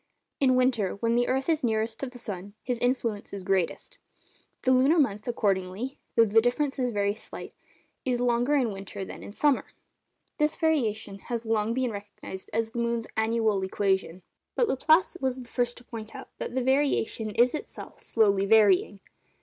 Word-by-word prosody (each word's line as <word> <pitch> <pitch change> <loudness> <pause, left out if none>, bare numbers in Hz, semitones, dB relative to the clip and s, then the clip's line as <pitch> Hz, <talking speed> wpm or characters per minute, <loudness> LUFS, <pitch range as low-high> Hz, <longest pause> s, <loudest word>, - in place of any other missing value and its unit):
In 260 -2 +4
winter, 250 -6 +2
when 230 +3 0
the 245 +1 +2
earth 265 +1 0
is 320 -4 +1
nearest 220 -1 0
to 275 - -3
the 250 0 -10
sun, 200 -3 -6
his 245 -2 -2
influence 235 -5 -1
is 200 -2 -5
greatest. 185 -2 -1 0.6
The 260 - +3
lunar 265 +6 +5
month, 215 -8 +1
accordingly 205 +2 -1 0.2
(though 230 - +6
the 225 +1 +4
difference 270 +4 0
is 250 -1 +1
very 205 -2 0
slight), 220 - -8 0.5
is 250 -2 0
longer 245 +3 +2
in 250 -6 +2
winter 195 0 -6
than - - -9
in - - -9
summer. 285 +5 +2 0.7
This 300 +1 +2
variation 225 -10 0
had 235 +2 -4
long 220 0 0
been 255 -2 0
recognised 200 -2 -8
as 225 0 -1
the 235 - -4
moon's 235 -1 0
'annual 220 -2 +1
equation;' 190 -2 -1 0.3
but 480 - +2
Laplace 320 +6 +3
was 260 -1 0
the 240 - -17
first 245 -1 -1
to 245 - -13
point 225 +1 -8
out 265 - -9
that - - -4
the 260 - +1
variation 265 -4 +1
is 240 +4 +3
itself 305 - -7
slowly 200 -3 +2
varying. 205 -2 +4
230 Hz, 175 wpm, -27 LUFS, 205-255 Hz, 0.7 s, though